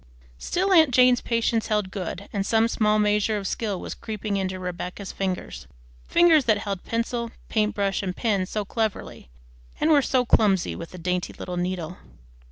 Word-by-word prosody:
Still 380 +2 0
aunt 320 -5 +7
Jane's 250 -1 +5
patience 230 -1 0
held 210 -3 0
good, 190 0 -5
and 200 -2 0
some 225 +2 +2
small 215 -2 +2
measure 210 0 +2
of 200 - -5
skill 205 -2 -2
was - - -6
creeping 215 -2 -4
into 190 -1 -2
Rebecca's 180 +2 -6
fingers, 185 - -4 0.4
fingers 335 -5 +5
that 215 -3 +3
held 200 -2 -4
pencil, 235 0 -2 0.2
paint 215 -1 +1
brush, 200 -1 0
and 185 -2 -4
pen 200 -5 0
so 210 +1 -3
cleverly 220 - -3 0.5
and 320 - +2
were 290 -2 +6
so 255 -2 +1
clumsy 200 -6 +2
with 170 - -7
the 180 - -11
dainty 180 +1 -2
little 180 - -6
needle. 175 -1 -3
210 Hz, 175 wpm, -25 LUFS, 185-230 Hz, 0.5 s, aunt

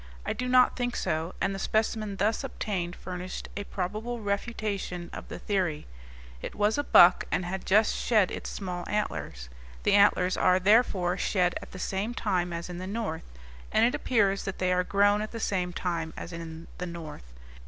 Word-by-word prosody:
I - - -1
do 250 +3 -3
not 255 0 +5
think 245 -1 -2
so; 160 +3 -2
and 195 +1 0
the 195 - -5
specimen 215 -1 0
thus 210 +6 0
obtained 190 -9 -3
furnished 185 0 -6
a 205 - -4
probable 215 +7 -3
refutation 200 -4 -3
of - - -7
the - - -7
theory. 180 -7 -1 0.6
It - - -6
was 210 +5 +2
a - - +1
buck, 180 -9 +7
and 180 - 0
had 190 +2 -4
just 210 +3 +4
shed 215 -6 +2
its - - -5
small 180 -3 -4
antlers. 70 - -3 0.4
The - - +3
antlers 200 -2 +4
are, 185 0 +4
therefore, 190 -3 +3
shed 180 -3 +2
at - - -10
the - - -8
same 195 +5 -2
time 180 -6 0
as 170 0 -4
in 180 -1 -7
the 185 - -5
north, 200 - -4 0.4
and - - +4
it 245 - +2
appears 210 -9 +1
that 195 - -4
they 185 0 +1
are 180 0 +2
grown 205 +2 +3
at 215 - -3
the 230 - -6
same 180 -4 -1
time 170 -2 -3
as 170 - -7
in 165 0 -7
the 180 - -3
north. 155 - -9
190 Hz, 190 wpm, -28 LUFS, 175-215 Hz, 0.6 s, buck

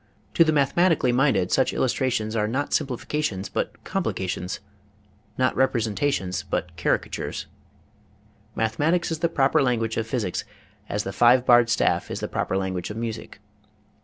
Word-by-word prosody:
To 165 - +6
the 160 - +2
mathematically 150 -1 +3
minded 120 -8 +2
such 130 - +2
illustrations 120 -4 0
are 105 -1 +1
not 135 +6 -2
simplifications 135 -6 -2
but - - -4
complica 95 - -2
tions, 90 +1 -4 0.8
not 130 -1 +1
representations 115 -6 0
but 90 -2 -4
caricatures. 85 - -2 1.1
Mathe 110 0 -1
matics 165 +3 +1
is 160 - -2
the 170 0 +1
proper 135 -4 +2
language 115 -4 0
of 110 -1 -1
physics 110 -6 -2 0.5
as 105 0 -1
the 95 - -5
five 125 +1 +5
barred 120 -2 +6
staff 115 - +1
is - - -4
the - - -3
proper 95 - -1
language 95 -2 -3
of 105 - -6
music. 115 -2 -5
120 Hz, 150 wpm, -24 LUFS, 105-135 Hz, 1.1 s, To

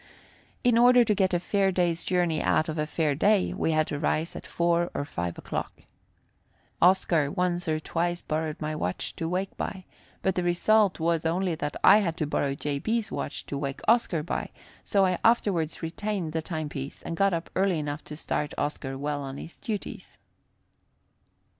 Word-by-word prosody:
In 245 -2 +4
order 245 0 +7
to 210 - +3
get 190 -2 +2
a 175 - +2
fair 195 +1 +1
day's 175 -2 0
journey 175 -3 +1
out 155 - +2
of 155 -1 -3
a 150 - 0
fair 155 -2 0
day, 200 +6 +2
we - - -1
had 155 -1 +3
to 145 - -4
rise 155 +2 0
at - - -8
4 170 0 +1
or 145 - -1
5 85 - -4
o'clock. - - -5 1.0
Oscar 170 -5 +4
once 175 +2 -1
or 155 -1 +1
twice 175 +2 -2
borrowed 155 0 -2
my 155 0 -3
watch 90 -10 -3
to 165 - -2
wake 185 +2 -2
by, 190 -2 -4 0.4
but 190 - +2
the 180 - -1
result 185 +3 +3
was 165 0 +1
only 175 +2 0
that 145 -2 -3
I 205 - +8
had 170 -6 -1
to 155 - 0
borrow 140 -1 0
J. 145 0 -2
B.'s 225 +5 -1
watch - - -4
to 140 - -4
wake 140 -1 -4
Oscar 215 -9 +3
by; 170 - -3 0.3
so 195 -1 +3
I 185 -2 0
afterwards 195 -10 +2
retained 175 0 -3
the 160 - 0
timepiece, 150 -4 -5
and 165 - -4
got 195 +2 +3
up 170 -1 -3
early 190 -2 +2
enough 150 0 -4
to 150 - -8
start 150 -2 -2
Oscar 140 -2 -3
well 145 +1 -2
on 135 0 -6
his 165 - -10
duties. 210 -3 -6
170 Hz, 185 wpm, -27 LUFS, 150-190 Hz, 1.0 s, I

